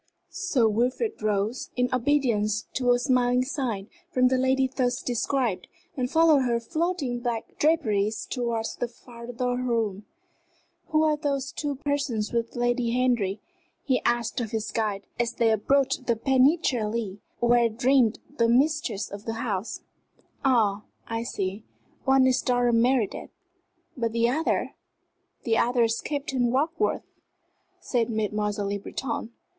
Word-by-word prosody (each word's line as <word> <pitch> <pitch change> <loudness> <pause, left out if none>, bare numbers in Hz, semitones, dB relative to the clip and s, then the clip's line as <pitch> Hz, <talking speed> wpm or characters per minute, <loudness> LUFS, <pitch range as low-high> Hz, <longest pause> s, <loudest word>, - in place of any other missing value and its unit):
Sir 360 - +1
Wilfrid 250 - 0
rose, 210 +3 -1
in 250 0 +2
obedience 235 -6 +1
to 250 -1 0
a 245 - +5
smiling 250 0 +2
sign 245 -8 -3 0.2
from 255 -3 +3
the 260 - +2
lady 260 0 +2
thus 250 -1 -1
described, 245 -3 -1 0.3
and 250 -3 -1
followed 320 -2 +5
her 240 -2 +1
floating 310 -2 -2
black 240 -2 -4
draperies 220 -10 +1
towards 235 -3 -2
the 245 - -2
farther 245 +1 -5
room. 225 -5 -1 0.8
"Who 310 -1 +2
are 310 -1 +3
those 280 -2 -2
two 290 -2 -3
persons 275 -6 -2
with 230 -1 -1
Lady 240 0 +1
Henry?" 220 -6 +1 0.4
he 260 -3 +1
asked 240 +1 0
of 225 - -3
his 220 0 -3
guide, 210 -3 -2
as 235 0 0
they 230 -1 +2
approached 265 +4 +1
the 235 - +3
penetralia 235 - +1 0.2
where 240 -1 +4
reigned 245 0 +3 0.2
the 230 0 +4
mistress 275 -4 +1
of 200 +1 -8
the 225 - -2
house. 225 -3 -3 0.6
"Ah, 220 -7 +3 0.2
I 225 0 -3
see! 200 -3 -3 0.4
one 265 0 +5
is 255 -1 +3
Dr. 245 -1 +2
Meredith 235 -1 +1 0.7
but 230 -3 -2
the 230 0 +3
other?" 315 +6 0 0.7
"The 225 -2 +2
other 245 0 +3
is 230 0 0
Captain 275 -4 -1
Warkworth," 320 - 0 0.7
said 240 -3 0
Mademoiselle 210 -2 -1
Le 200 0 -2
Breton. 230 +2 -4
245 Hz, 140 wpm, -26 LUFS, 225-265 Hz, 0.8 s, a